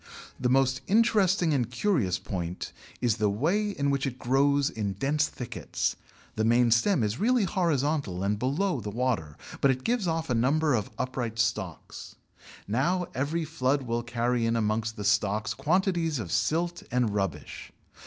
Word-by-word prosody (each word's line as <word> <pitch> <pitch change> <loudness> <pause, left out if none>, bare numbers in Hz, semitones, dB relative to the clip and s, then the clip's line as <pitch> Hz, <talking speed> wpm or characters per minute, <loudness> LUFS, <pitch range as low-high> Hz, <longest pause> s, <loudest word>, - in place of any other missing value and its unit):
The 125 - +1
most 130 0 +2
interesting 195 -6 +3
and 125 -4 0
curious 125 - +1
point 90 -2 -5 0.3
is 120 -3 +2
the 105 -2 +2
way 170 - +1
in 140 -8 -1
which 140 0 0
it 130 -1 -5
grows 140 +3 +2
in 105 -3 -3
dense 145 +9 +1
thickets; 125 - -3 0.4
the 110 - 0
main 120 +1 +4
stem 120 - +3
is 105 +3 -1
really 245 +1 +3
horizontal 150 - 0
and 100 +1 0
below 140 - 0
the 105 - -5
water, 110 - -2 0.2
but 140 - +4
it 130 -1 0
gives 235 -5 0
off 165 -1 -1
a 125 - 0
number 140 +6 +2
of 110 -4 -1
upright 125 -3 -3
stalks. 110 -6 -3 0.5
Now 170 - +1
every 155 +5 -1
flood 140 -3 0
will 120 -1 -1
carry 120 0 0
in 115 - +1
amongst 110 0 0
the 105 - -6
stalks 105 +1 +1
quantities 170 - +1
of 105 -8 -5
silt 165 +10 0
and 125 -4 +1
rubbish. 95 -6 -4
130 Hz, 165 wpm, -28 LUFS, 110-160 Hz, 0.5 s, main